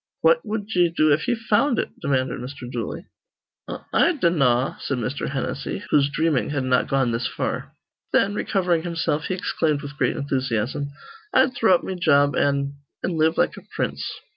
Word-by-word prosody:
"What - - +4
wud 210 -1 -3
ye 175 -1 +4
do 155 -3 +3
if 155 - -1
ye 245 - +2
found 225 +3 +1
it?" - - -1
demanded 130 -3 0
Mr. 125 0 -7
Dooley. 120 -2 -5 0.6
"I - - -6
I 345 - +4
dinnaw," 140 - +2
said 140 - -2
Mr. 125 +4 -3
Hennessy, 140 +7 -3
whose 140 -1 +4
dreaming 150 -2 +1
had 145 -2 -1
not 130 -1 +2
gone 135 -3 +1
this 115 +2 -1
far. - - -4 0.4
Then, 200 - +3
recovering 180 -5 +1
himself, 165 -3 -1
he 185 - -1
exclaimed 155 -5 -1
with 145 +1 -8
great - - +1
enthusiasm, 135 -1 -1 0.5
"I'd 260 0 +4
throw 220 -6 +4
up - - -2
me 190 - -3
job 145 -5 +3
an' 140 0 0 0.3
an' 180 - -1
live 160 +1 +3
like - - +2
a - - -9
prince." - - -2
150 Hz, 180 wpm, -23 LUFS, 135-180 Hz, 0.6 s, What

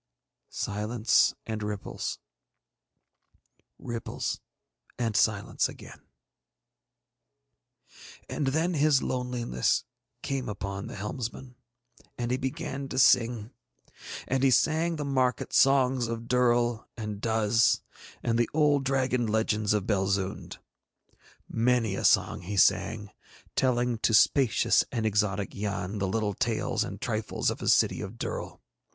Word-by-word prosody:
Silence 105 +3 +1
and 110 -1 -4
ripples, 105 -1 -4 1.6
ripples 115 -1 -4 0.6
and 115 -3 -1
silence 100 0 +1
again. - - -12 2.3
And 145 - -2
then 160 +6 +1
his 150 -3 +3
loneliness 125 - -1 0.4
came 135 -4 -2
upon 100 -1 -5
the - - -8
helmsman, 120 +4 -5 0.6
and 120 0 -2
he 125 - +1
began 135 +1 -4
to - - -5
sing. 120 -3 +3 0.8
And 130 0 0
he 135 - +4
sang 160 +6 +2
the 150 -2 -4
market 130 -3 0
songs 130 -2 +4
of 115 0 -4
Durl 120 -2 +2
and 105 -2 -5
Duz, 110 0 +2 0.4
and 115 0 +1
the 120 - +2
old 145 -3 +3
dragon 130 -3 0
legends 110 -1 0
of 105 -2 +1
Belzoond. 95 -1 -1 0.9
Many 115 -2 +1
a - - -3
song - - +3
he 100 +3 -5
sang, 100 +2 +2 0.4
telling 125 -2 +1
to 110 - +2
spacious 130 +3 +4
and 115 -2 -2
exotic 105 -2 0
Yann 100 -1 -3
the 95 - 0
little 105 +1 -1
tales - - -1
and - - -7
trifles - - -1
of - - -6
his - - +2
city - - +2
of 95 - -6
Durl. - - -5
115 Hz, 120 wpm, -28 LUFS, 105-130 Hz, 2.3 s, he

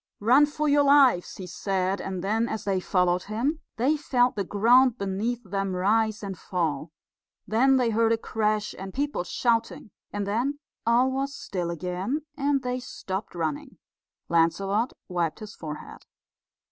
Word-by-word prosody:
"Run 255 +8 +5
for 300 +1 -2
your 290 0 +4
lives," 275 -10 +4
he 185 - -6
said, 190 +2 -1
and 185 -2 -4
then, 225 +4 0
as 220 - -4
they 195 -2 0
followed 180 -1 +1
him, 245 +10 -1 0.2
they 265 +7 +2
felt 255 -4 +1
the 200 - -1
ground 240 +6 +4
beneath 210 +5 -2
them 195 -1 -2
rise 215 +3 +1
and 195 -1 -4
fall. 165 -4 -2 0.6
Then 265 +5 +4
they 245 -3 +2
heard 225 +1 +2
a 230 - +3
crash, 215 -1 -1
and 190 0 -7
people 285 -8 -1
shouting, 230 +3 -1 0.2
and 205 -1 -3
then 240 +8 -1 0.3
all 245 +3 +4
was 275 +1 -2
still 180 -3 -4
again, 180 - -3
and 280 -2 0
they 250 0 -2
stopped 190 -6 -6
running. 160 -4 -3 0.5
Lancelot 195 +8 +1
wiped 170 -4 -1
his 210 -1 -9
forehead. 150 -2 -8
215 Hz, 155 wpm, -26 LUFS, 185-250 Hz, 0.6 s, Run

